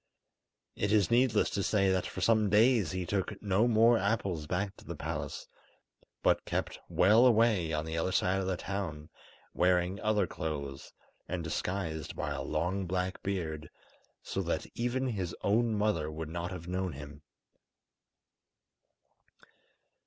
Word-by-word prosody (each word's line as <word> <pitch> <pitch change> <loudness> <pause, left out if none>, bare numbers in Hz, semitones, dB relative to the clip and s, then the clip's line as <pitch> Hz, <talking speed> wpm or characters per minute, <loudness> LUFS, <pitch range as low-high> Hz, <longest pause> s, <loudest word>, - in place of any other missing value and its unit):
It 100 - -1
is 105 -1 +3
needless 120 -3 +3
to 100 - -1
say 100 -1 +2
that 95 -1 0
for 95 - -6
some 110 +1 +3
days 110 -1 +4
he 95 -1 -3
took 95 +2 -2
no 105 +3 +2
more 115 0 +5
apples 95 -6 -1
back 95 +4 -2
to - - -15
the - - -6
palace, - - -5 0.8
but - - +3
kept - - -3
well 105 +6 +5
away 110 -8 +3
on 75 0 -1
the 80 +1 -2
other 95 - 0
side 95 +1 +1
of 95 - -3
the 95 -2 -1
town, 85 -7 -5 0.4
wearing 90 +2 +2
other 105 -2 +2
clothes, 70 -5 -5 0.4
and 90 -1 -3
disguised 80 -1 -3
by - - -3
a - - -3
long 90 +5 -1
black 90 +1 -2
beard, 80 -5 -3 0.5
so - - -2
that - - -2
even 125 +2 -1
his 95 -7 -3
own 110 +2 +2
mother 105 -8 0
would 80 0 -6
not 85 +2 -4
have 90 -2 -7
known 90 -1 -2
him. 75 +1 -10
95 Hz, 150 wpm, -31 LUFS, 85-105 Hz, 0.8 s, more